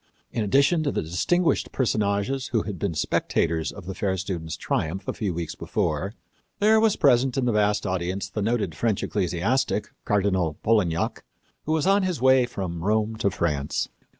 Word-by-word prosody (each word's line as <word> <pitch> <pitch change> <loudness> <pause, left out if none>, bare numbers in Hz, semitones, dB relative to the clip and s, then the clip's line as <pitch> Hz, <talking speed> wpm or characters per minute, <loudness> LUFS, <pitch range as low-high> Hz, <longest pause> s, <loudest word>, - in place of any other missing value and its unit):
In 115 - -1
addition 140 - +3
to 145 -2 0
the - - -1
distinguished 160 - +1
personages 110 +2 0
who 115 -4 0
had 100 -4 -6
been 95 -5 -2
spectators 80 +1 0
of 100 -3 -11
the 95 - -4
fair 95 0 -1
student's 85 -4 -4
triumph 90 +6 -2
a - - -1
few 105 -4 -2
weeks 85 -1 -4
before, 85 +8 -2 0.4
there 220 +1 +5
was 220 -2 +3
present 130 -1 +3
in 130 - +1
the 120 - +2
vast 105 -1 +1
audience 95 +1 -2
the 105 +2 -4
noted 105 -5 0
French 110 +5 0
ecclesiastic, 100 +5 0
Cardinal 95 -6 +1
Polignac, 100 -7 +1 0.4
who 155 - +1
was 160 0 +1
on 195 +1 +4
his 185 -6 -1
way 130 0 +5
from 90 -7 -5
Rome 110 +2 +1
to 100 - +1
France. 75 -6 -1
105 Hz, 175 wpm, -25 LUFS, 90-125 Hz, 0.4 s, there